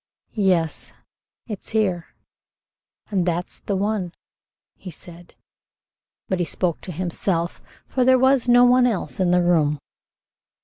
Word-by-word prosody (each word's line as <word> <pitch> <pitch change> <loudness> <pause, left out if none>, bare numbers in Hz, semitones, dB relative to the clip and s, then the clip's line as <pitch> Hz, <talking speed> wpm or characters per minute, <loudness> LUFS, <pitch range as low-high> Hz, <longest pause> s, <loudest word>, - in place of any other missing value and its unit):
"Yes, 180 -7 0 0.5
it's 210 -5 -7
here, 190 -6 0 1.0
and 190 -3 +1
that's 175 0 -3
the 200 - -3
one," 195 -3 -2 0.6
he 190 - -10
said, 175 +1 -13 0.9
but 185 - -1
he 175 - +1
spoke 170 +2 -2
to 185 - -7
himself, 175 0 -2 0.3
for 255 - 0
there 260 +1 +5
was 260 -1 +3
no 245 0 +7
one 250 0 +5
else 215 -5 -2
in 185 -2 +2
the 180 0 +3
room. 155 -4 +2
185 Hz, 130 wpm, -22 LUFS, 175-220 Hz, 1.0 s, no